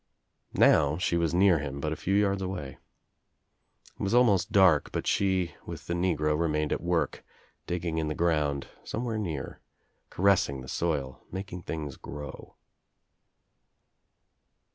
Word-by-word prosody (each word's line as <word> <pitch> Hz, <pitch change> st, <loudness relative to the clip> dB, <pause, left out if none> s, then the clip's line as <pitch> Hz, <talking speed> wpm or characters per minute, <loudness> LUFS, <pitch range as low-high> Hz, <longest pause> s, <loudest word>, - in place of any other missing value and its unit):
Now 70 Hz, +2 st, +5 dB
she 85 Hz, -, 0 dB
was 85 Hz, -2 st, +1 dB
near 90 Hz, -1 st, +4 dB
him, 70 Hz, -1 st, -5 dB
but 75 Hz, +2 st, -2 dB
a -, -, -4 dB
few 95 Hz, +5 st, -1 dB
yards 100 Hz, -1 st, +2 dB
away. 90 Hz, -8 st, -5 dB, 1.2 s
It -, -, -8 dB
was 100 Hz, +4 st, +1 dB
almost 110 Hz, -8 st, +4 dB
dark 95 Hz, -8 st, +5 dB
but -, -, -3 dB
she 95 Hz, -3 st, +1 dB
with -, -, -7 dB
the 85 Hz, -, -2 dB
negro 80 Hz, -4 st, +1 dB
remained 75 Hz, -2 st, 0 dB
at -, -, -3 dB
work, 85 Hz, -1 st, -1 dB, 0.4 s
digging 85 Hz, -2 st, -2 dB
in 80 Hz, -, -1 dB
the 75 Hz, -, -2 dB
ground 75 Hz, -5 st, 0 dB
— -, -, -28 dB
somewhere 115 Hz, -1 st, -3 dB
near 80 Hz, -10 st, -5 dB, 0.2 s
— -, -, -45 dB
caressing 90 Hz, -8 st, +2 dB
the 65 Hz, -, -10 dB
soil, 70 Hz, -6 st, -2 dB
making 95 Hz, -1 st, -6 dB
things 75 Hz, -5 st, -5 dB
grow. 75 Hz, -2 st, -9 dB
85 Hz, 145 wpm, -28 LUFS, 75-95 Hz, 1.2 s, Now